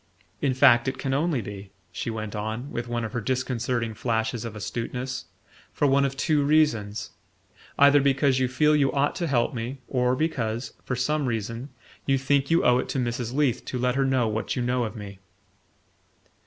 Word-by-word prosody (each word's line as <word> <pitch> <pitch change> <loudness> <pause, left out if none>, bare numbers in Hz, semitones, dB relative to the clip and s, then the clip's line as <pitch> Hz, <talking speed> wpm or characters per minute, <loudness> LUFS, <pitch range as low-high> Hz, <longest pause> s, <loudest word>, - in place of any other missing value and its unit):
In 135 -3 +1
fact, 130 -2 +6
it 130 - -1
can 135 -1 -2
only 150 -2 +1
be," 100 0 -8 0.2
she 90 +6 -4
went 110 -1 -5
on, 110 +6 -4
with 120 0 -4
one 120 -1 -2
of 110 - -6
her 120 - -2
disconcerting 125 -1 -1
flashes 110 0 -1
of 115 -2 -6
astuteness, 125 +4 -4 0.5
"for - - 0
one 140 0 +4
of 135 0 -3
two 150 0 +2
reasons; 115 -10 +1 0.7
either 140 0 +6
because 135 -1 +2
you 130 - +2
feel 150 +4 +3
you 140 -2 +3
ought 140 +1 +1
to 175 -3 -1
help 125 -4 +1
me, 120 +3 -4
or 125 -1 +1
because, 125 -6 -2
for 125 - -2
some 145 +3 0
reason, 115 +3 -3 0.4
you 135 -1 +3
think 140 +1 +1
you 165 +1 +3
owe 125 0 +5
it - - -3
to - - -2
Mrs. 120 -1 -2
Leath 140 -5 +1
to 130 - -4
let 125 0 +1
her 135 +1 +1
know 130 -3 +2
what 110 +1 -2
you 125 - -1
know 125 0 +1
of 110 +1 -6
me." 100 -3 -9
125 Hz, 195 wpm, -26 LUFS, 115-140 Hz, 0.7 s, fact